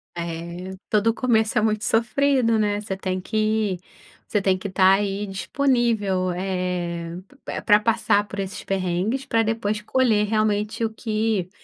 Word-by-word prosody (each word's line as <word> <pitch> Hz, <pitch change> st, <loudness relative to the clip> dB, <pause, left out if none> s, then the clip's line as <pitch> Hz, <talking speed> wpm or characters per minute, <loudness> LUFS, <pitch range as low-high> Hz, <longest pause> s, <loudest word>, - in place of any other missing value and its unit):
É, 170 Hz, +2 st, -5 dB
todo 215 Hz, +1 st, +3 dB
começo 225 Hz, -3 st, +1 dB
é -, -, +4 dB
muito 215 Hz, 0 st, 0 dB
sofrido, 235 Hz, 0 st, +2 dB
né. 205 Hz, -1 st, 0 dB
Você 195 Hz, -2 st, -4 dB
tem 185 Hz, -1 st, -3 dB
que 215 Hz, -1 st, 0 dB, 0.5 s
você 210 Hz, -, 0 dB
tem 190 Hz, -1 st, +2 dB
que 200 Hz, +1 st, -5 dB
estar 190 Hz, 0 st, +5 dB
aí, 200 Hz, +1 st, -1 dB
disponível, 205 Hz, -3 st, 0 dB
eh, 180 Hz, -2 st, -3 dB, 0.3 s
pr -, -, -5 dB
pra 210 Hz, -1 st, +6 dB
passar 210 Hz, -2 st, +2 dB
por 200 Hz, -, -6 dB
esses 195 Hz, -1 st, -4 dB
perrengues, 195 Hz, +7 st, -1 dB
pra 225 Hz, 0 st, +2 dB
depois 215 Hz, -1 st, -1 dB
colher, 220 Hz, -2 st, +2 dB
realmente, 215 Hz, +1 st, 0 dB
o -, -, -1 dB
que 215 Hz, -4 st, -1 dB
210 Hz, 150 wpm, -23 LUFS, 185-220 Hz, 0.5 s, pra